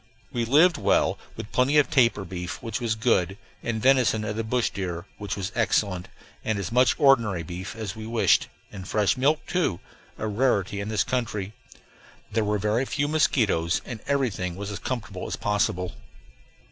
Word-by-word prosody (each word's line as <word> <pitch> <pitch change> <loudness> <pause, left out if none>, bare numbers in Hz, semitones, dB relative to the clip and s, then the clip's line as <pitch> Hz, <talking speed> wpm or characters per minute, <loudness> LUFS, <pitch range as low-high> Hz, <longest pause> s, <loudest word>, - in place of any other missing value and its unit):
We 120 -1 0
lived 155 +8 +5
well, - - +2 0.2
with 105 - -8
plenty 135 +4 +3
of 145 - +5
tapir 120 -9 +3
beef, 90 -1 -5
which 115 +3 -3
was 115 -2 0
good, 100 -5 +1 0.2
and 115 -2 -2
venison 125 -3 +3
of 105 0 -3
the 115 - -2
bush 120 +2 0
deer, 90 -3 -4
which 100 -1 -4
was 100 0 -3
excellent; 100 -5 0 0.4
and 110 -2 0
as 100 -1 -4
much 125 0 +4
ordinary 115 - +4
beef 90 +6 -7
as 110 -5 -5
we 110 0 -7
wished, 115 0 +3 0.2
and 95 -2 -8
fresh 105 +4 +2
milk, 145 +4 +1
too 175 - 0 0.4
a - - -3
rarity 105 -3 +1
in 100 +1 -4
this 110 -2 +2
country. 110 -5 -2 0.8
There 110 +1 +1
were 105 0 +1
very 105 +6 +1
few 145 +2 -1
mosquitoes, 110 - +2
and 120 -3 -6
everything 110 -11 0
was 100 +2 -5
as 100 - -5
comfortable 115 -7 -4
as - - -3
possible. 90 -3 0
110 Hz, 175 wpm, -26 LUFS, 100-125 Hz, 0.8 s, lived